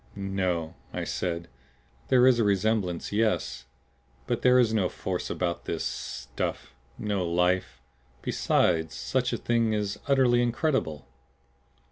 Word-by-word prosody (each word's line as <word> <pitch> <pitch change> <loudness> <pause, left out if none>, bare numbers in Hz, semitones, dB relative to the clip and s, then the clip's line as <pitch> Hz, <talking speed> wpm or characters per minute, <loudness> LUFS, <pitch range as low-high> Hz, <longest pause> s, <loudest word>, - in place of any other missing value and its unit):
"No," 95 -5 -2 0.2
I - - -3
said. 85 -1 -3 0.6
"There 125 -1 +5
is 130 -2 +5
a - - +4
resemblance, 100 -3 0
yes. 100 - 0 0.6
But - - -1
there 125 0 +5
is 120 -3 +4
no 95 -5 +2
force 90 -2 -4
about 85 -2 -2
this - - -2
stuff; 65 +2 -4 0.2
no 105 -3 -1
life. 90 -5 +1 0.4
Besides, 80 -1 +1
such - - -1
a - - -1
thing 115 -2 +1
is 105 -2 -2
utterly 130 -3 +4
incredible." 120 - 0
100 Hz, 125 wpm, -27 LUFS, 85-115 Hz, 0.6 s, There